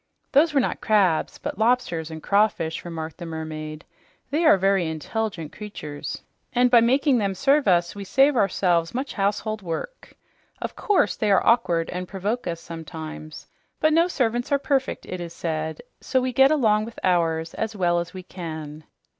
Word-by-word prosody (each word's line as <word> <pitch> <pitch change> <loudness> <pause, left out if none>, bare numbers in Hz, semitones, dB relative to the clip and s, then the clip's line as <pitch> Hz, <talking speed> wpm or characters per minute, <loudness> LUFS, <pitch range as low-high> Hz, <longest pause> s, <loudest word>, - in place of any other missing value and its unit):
"Those 300 +4 +5
were 290 - +3
not 255 - -1
crabs, 195 -7 +2
but - - -6
lobsters 220 -9 +1
and 160 -1 -8
crawfish," 200 -6 +1
remarked 165 -2 -6
the 175 - -6
mermaid. 155 -1 -6 0.5
"They 320 +4 +1
are 310 - +7
very 195 -2 +2
intelligent 165 +1 -3
creatures, 155 -9 -7 0.3
and 250 0 +3
by 240 -2 +7
making 260 +2 +3
them 200 -2 -1
serve 275 +5 +3
us 175 -2 +3
we 200 - -7
save 270 +9 +3
ourselves 180 -5 +1
much 265 +2 -3
household 210 +2 -1
work. 185 - -6 0.4
Of - - -5
course, 415 -4 +2
they 215 - 0
are 195 - +4
awkward 175 -9 +3
and 180 0 -4
provoke 205 +4 -3
us 170 -1 -3
sometimes, 160 -1 -8 0.3
but 310 0 +3
no 335 +2 +4
servants 245 -7 -1
are 280 - +4
perfect, 275 -1 -1
it 185 -1 -6
is 170 -1 -7
said, 160 +4 -3 0.2
so 260 - 0
we 255 0 -2
get 270 +2 +6
along 220 -8 +3
with 230 - -10
ours 165 -2 +1
as 220 -1 -3
well 175 -3 +2
as 170 +1 -4
we 185 0 -8
can." 155 -4 -7
195 Hz, 175 wpm, -24 LUFS, 165-245 Hz, 0.5 s, are